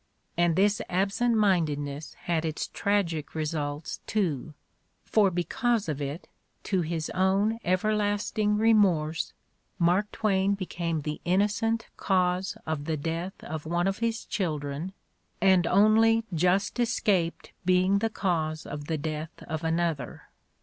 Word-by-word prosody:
And 175 -1 +2
this 205 +2 +3
absent 200 +6 +1
mindedness 150 -7 0
had 165 -2 0
its 160 -1 -3
tragic 170 -8 -1
results 150 -1 -3
too, 160 - -1 0.5
for 210 -3 +4
because 220 +5 0
of 150 -2 -3
it, 145 +5 -5 0.4
to 190 -3 0
his 165 -1 -3
own 195 +4 +2
everlasting 210 +2 +1
remorse, 185 -8 +3 0.5
Mark 180 +4 +2
Twain 200 -2 +1
became 170 -4 -3
the 150 +1 -4
innocent 210 +5 +1
cause 185 0 +1
of 155 -2 -3
the 160 -1 -1
death 165 +5 -4
of 155 0 -6
one 175 +2 +1
of 195 +1 -1
his 230 -1 -1
children 155 -1 -3 0.5
and 190 -3 +4
only 225 +3 +5
just 180 +7 +1
escaped 200 -8 0
being 185 +2 +3
the 225 +2 0
cause 160 -7 -1
of 145 0 -6
the 160 +1 -1
death 155 +2 -5
of 160 0 -4
another. 160 -5 -2
180 Hz, 130 wpm, -28 LUFS, 160-205 Hz, 0.5 s, only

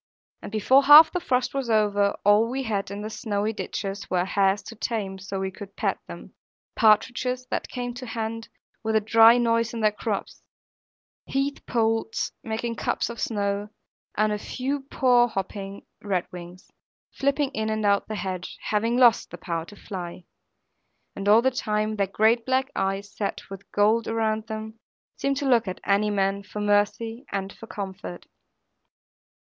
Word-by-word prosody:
And - - -8
before 260 +6 +4
half 300 +3 +10
the 360 - -1
frost 255 -6 0
was 270 -3 -2
over, 205 -2 +2
all 210 +3 +5
we 265 +2 -2
had 205 -5 -2
in 200 +1 -6
the 215 - -4
snowy 215 -1 -2
ditches 200 -2 -5
were 180 -1 +1
hares 195 +1 +1
so 230 - -8
tame 205 -4 -3
that 195 - -2
we 190 0 -2
could 200 +1 -11
pat - - -1
them; - - -10 0.4
partridges 245 +3 +2
that - - -2
came 245 -1 -4
to 255 +1 -8
hand, 225 0 -4 0.3
with 220 0 0
a - - +6
dry 225 +2 +6
noise 230 -1 +1
in 230 - -3
their 215 -1 +4
crops; 210 - -4 0.9
heath 275 +1 -2
poults, 225 -1 0
making 225 +1 -3
cups - - -1
of 235 - -8
snow; 205 -1 -1 0.5
and 215 0 +2
a 210 - -3
few 270 +5 -4
poor 245 -2 +4
hopping 195 -1 -5 0.2
redwings, 180 -2 -5 0.4
flipping 280 0 0
in 220 -4 -2
and 215 -1 -1
out 200 0 +2
the 215 - -4
hedge, 185 -3 -5
having 225 +3 +1
lost 240 -3 +5
the - - -9
power 165 -2 -4
to 205 - -13
fly. 180 -3 -7 0.9
And 200 +1 -2
all 220 +3 +6
the 260 - +3
time 215 -3 -1
their 200 -1 +1
great 220 +4 +2
black 260 +2 0
eyes, 195 +1 -2
set 200 -1 -4
with 195 0 -10
gold 215 +3 +2
around 220 -1 -1
them, 220 0 -6 0.4
seemed 275 0 -1
to 280 - -1
look 235 -4 +3
at 185 - -4
any 200 +1 +2
man, 195 -1 0
for 210 +1 -8
mercy 210 +3 0
and 195 0 -3
for 225 - -12
comfort. 190 -3 -7
215 Hz, 170 wpm, -25 LUFS, 200-235 Hz, 0.9 s, half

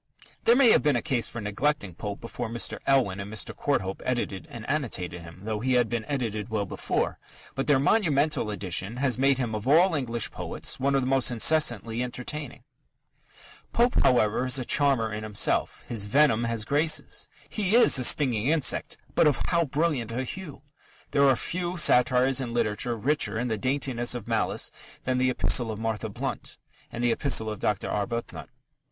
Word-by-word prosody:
There 235 - +6
may 250 -3 +6
have - - +5
been 150 -3 +2
a 120 - 0
case 130 -7 0
for 115 - -7
neglecting 105 0 -1
Pope 100 +4 -6
before 115 -1 -5
Mr. 115 0 -3
Elwin 125 -8 +2
and 100 +1 -6
Mr. 110 - -4
Courthope 95 -10 -2
edited 110 -8 -3
and 115 -1 -9
annotated 90 - -2
him 85 +2 -13
though 110 0 -3
he 130 +3 0
had 120 -2 +2
been 115 -2 -3
edited 115 -6 -3
well 110 -2 -1
before - - -2 0.3
but 135 - -3
their 145 -2 +5
monumental 145 - +1
edition 100 +2 -3
has 130 -2 0
made 135 0 +3
him 120 -4 -2
of 105 +3 -4
all 170 +6 +5
English 120 -6 0
poets - - -4
one 140 +1 +1
of 135 - +2
the - - -2
most 135 -1 +3
incessantly 120 -3 +2
entertaining. 125 +3 -5 1.1
Pope, 240 +1 +3
however, 115 -2 +3
is 130 +1 +4
a 130 - -2
charmer 130 -7 +2
in 105 - -4
himself. 110 -1 0
His 110 -4 -2
venom 120 0 +3
has 115 -2 -1
graces. 155 +5 0 0.2
He 210 0 0
is 240 - +6
a - - 0
stinging 125 -4 +3
insect, 155 -2 +1 0.2
but - - +4
of 145 - +2
how 170 -1 +2
brilliant 145 -5 -1
a 125 +3 -2
hue! 150 0 -8 0.5
There 140 -1 +4
are 135 - +5
few 175 +7 -3
satires 130 -2 +4
in 120 -2 -5
literature 120 +1 0
richer 130 +1 0
in 120 +2 -2
the 110 - 0
daintiness 130 -1 0
of 120 - -7
malice - - 0 0.3
than 125 0 0
the 130 0 +2
Epistle 120 -2 +1
to - - -10
Martha 110 -1 -3
Blount 100 - -6 0.3
and 120 0 -4
the 120 - +3
Epistle 115 -4 -1
to - - -6
Dr. 105 0 -1
Arbuthnot. 115 +3 -4
125 Hz, 185 wpm, -26 LUFS, 110-140 Hz, 1.1 s, There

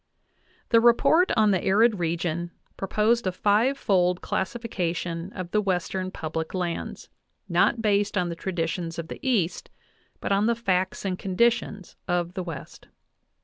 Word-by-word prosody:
The 230 -1 +5
report 240 +9 +4
on 215 -1 +5
the 190 - +1
arid 210 +1 +3
region 170 0 -1 0.3
proposed 215 +3 +1
a - - +1
fivefold 200 -3 +2
classifi 230 +4 -3
cation 170 0 -2
of 185 -2 -6
the 210 - +2
Western 185 -1 -1
public 160 0 -4
lands, 175 -2 -4 0.4
not 230 - +2
based 205 -1 +1
on 180 -2 +1
the 170 - -4
traditions 165 -1 -3
of 165 -1 -5
the - - -7
East, 215 -10 0 0.5
but - - -3
on 200 +2 +3
the 235 - +2
facts 190 -4 -1
and 185 -2 -2
conditions 210 0 0
of 175 -1 -1
the 185 - -3
West. 170 -3 -8
185 Hz, 145 wpm, -26 LUFS, 175-215 Hz, 0.5 s, The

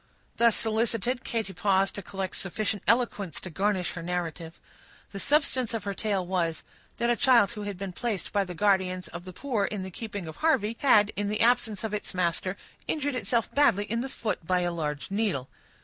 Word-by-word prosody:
Thus 235 -2 +5
solicited, 230 +2 +1
Katy 220 -4 -2
paused 195 +2 +2
to 200 - -5
collect 190 0 -4
sufficient 205 +2 -1
eloquence 220 -5 +1
to 185 - -7
garnish 190 0 0
her 170 - -6
narrative. 170 -1 -4 0.5
The 200 - -6
substance 260 -3 +2
of 225 - -3
her 200 - -2
tale 195 -3 -1
was, 175 -3 -1 0.3
that 235 +1 +2
a - - +3
child 235 -6 +5
who 215 -3 -7
had 200 - -6
been 195 -1 -5
placed 210 -3 -3
by 200 -1 +3
the 180 -2 -7
guardians 185 -1 +1
of 175 +1 -8
the 185 - -7
poor 225 +1 -1
in 205 -2 -3
the 190 - -6
keeping 205 -2 -6
of 160 -1 -8
Harvey, 240 -9 +2
had, 215 -6 +5
in 205 0 -1
the 210 - -1
absence 225 -3 +3
of 220 -1 -3
its 205 -2 -3
master, 180 +2 0 0.3
injured 290 -2 -1
itself 230 -1 0
badly 240 -9 +4
in 230 +3 -2
the 265 - -4
foot 215 -8 -3
by 180 -1 +2
a 175 0 0
large 150 -1 -3
needle. 195 - 0
205 Hz, 200 wpm, -28 LUFS, 185-230 Hz, 0.5 s, Thus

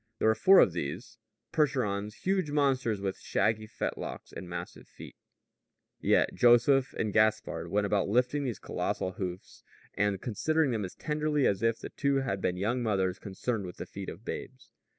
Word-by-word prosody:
There 110 - +3
were - - +5
four 190 +11 +6
of 90 - +6
these 90 - -5 0.3
Percherons, 105 -9 0
huge 190 -4 +1
monsters 135 -7 +1
with 95 -1 -3
shaggy 110 0 0
fetlocks - - -5
and 90 - -8
massive 90 - -7
feet; - - -12 0.8
yet - - +2
Joseph 125 +3 +4
and 105 -3 -2
Gaspard 110 -6 +1
went 100 +3 +1
about 100 -1 +1
lifting 125 +6 +2
these 125 -6 -3
colossal 95 - -2
hoofs, 90 -1 -6 0.3
and 100 -1 0
considering 150 - 0
them 110 -4 -1
as 90 - -9
tenderly 150 -2 0
as 100 -1 +1
if 115 0 +2
the - - -8
two 140 -1 0
had 100 -8 -2
been 90 0 0
young 115 +7 0
mothers 95 -5 0
concerned 100 +1 -3
with 90 - -9
the - - -5
feet 100 -1 -7
of 110 - -10
babes. 130 0 -7
110 Hz, 170 wpm, -30 LUFS, 100-130 Hz, 0.8 s, four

